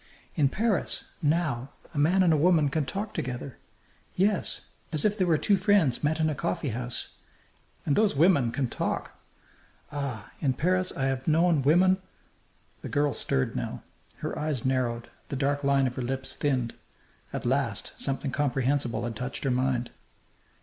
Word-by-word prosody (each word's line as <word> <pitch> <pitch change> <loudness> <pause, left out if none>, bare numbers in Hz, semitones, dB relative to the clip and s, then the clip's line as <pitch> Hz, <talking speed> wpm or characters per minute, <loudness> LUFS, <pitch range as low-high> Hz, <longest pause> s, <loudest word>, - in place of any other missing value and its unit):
In 140 -3 +3
Paris, 215 - 0 0.2
now, 145 -5 0 0.2
a 145 - -2
man 180 +6 +4
and 170 -3 +5
a 150 -1 +2
woman 165 -5 +4
can 150 +1 0
talk 205 +5 -4
together 125 0 -4 0.6
yes 195 +1 +1 0.3
as 155 +2 0
if 210 -1 +3
they 190 -3 +1
were 165 -3 +3
two 200 +5 +3
friends 185 - +3
met 155 +2 +1
in 160 - +3
a 155 - 0
coffeehouse. 130 -6 -3 0.7
And 140 - +2
those 210 -6 +3
women 140 -6 +4
can 130 +1 0
talk! - - -2 0.8
Ah! 135 -7 -4
in 135 -4 +1
Paris 180 +7 +1
I 135 - -1
have 135 0 -1
known 165 -1 +4
women 180 +7 +4 0.4
" - - -35
The - - -6
girl 145 -1 +1
stirred 65 -10 -1
now. - - -4 0.4
Her - - -2
eyes 150 -5 -2
narrowed; 120 -3 0 0.2
the - - -3
dark 140 +1 0
line 140 -1 +3
of 125 -1 -2
her - - -1
lips 130 +2 -3
thinned. 130 -5 0 0.6
At - - -4
last - - 0
something 135 0 -1
comprehensible 135 -1 0
had 120 -1 -3
touched 125 +4 -4
her 135 - +1
mind. 125 -1 0
145 Hz, 165 wpm, -28 LUFS, 130-170 Hz, 0.8 s, and